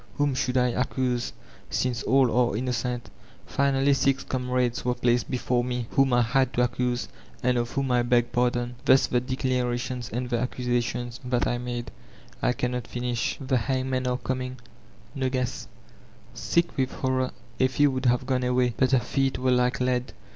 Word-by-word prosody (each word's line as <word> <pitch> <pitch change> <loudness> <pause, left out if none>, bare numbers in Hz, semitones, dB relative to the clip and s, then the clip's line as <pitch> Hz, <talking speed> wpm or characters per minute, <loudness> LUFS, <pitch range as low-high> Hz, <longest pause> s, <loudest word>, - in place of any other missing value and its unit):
Whom 145 -1 +2
should 130 -1 0
I 125 0 +3
accuse 125 0 -1 0.4
since 125 -3 -1
all 130 -2 +3
are 120 -3 +2
innocent? 125 0 -2 0.3
Finally 140 0 +2
six 135 0 +1
comrades 125 -1 -1
were 125 0 0
placed 120 0 +1
before 125 -1 0
me» 125 -1 -2
whom 135 -1 +3
I 120 0 +4
had 130 +2 +1
to 125 - +2
accuse, 125 0 -1 0.4
and 125 0 +3
of 120 -1 0
whom 135 0 -1
I 125 -1 +4
beg 120 0 +2
pardon. 120 0 0
Thus 130 - +5
the 125 - +1
declarations 125 -1 -2
and 125 +3 -3
the 120 -1 0
accusations 120 0 -2
that 125 -1 0
I 120 - 0
made.... 120 -2 -4 0.5
I - - +3
cannot 125 0 -2
finish; 120 -1 -2
the 135 -2 0
hangmen 130 +1 -1
are 125 0 +1
coming. 130 0 -3 0.6
Nogu^.'' 130 -2 -2 0.7
Sick 170 0 0
with 130 -1 +1
horror 130 -1 0 0.3
Effie 130 +3 +3
would 130 -2 +1
have 125 +1 +2
gone 130 -1 0
away, 125 -1 +2
but 130 0 +2
her 130 - +6
feet 135 +2 0
were 130 0 +1
like 125 0 +2
lead. 125 -1 0
125 Hz, 170 wpm, -26 LUFS, 120-130 Hz, 0.7 s, her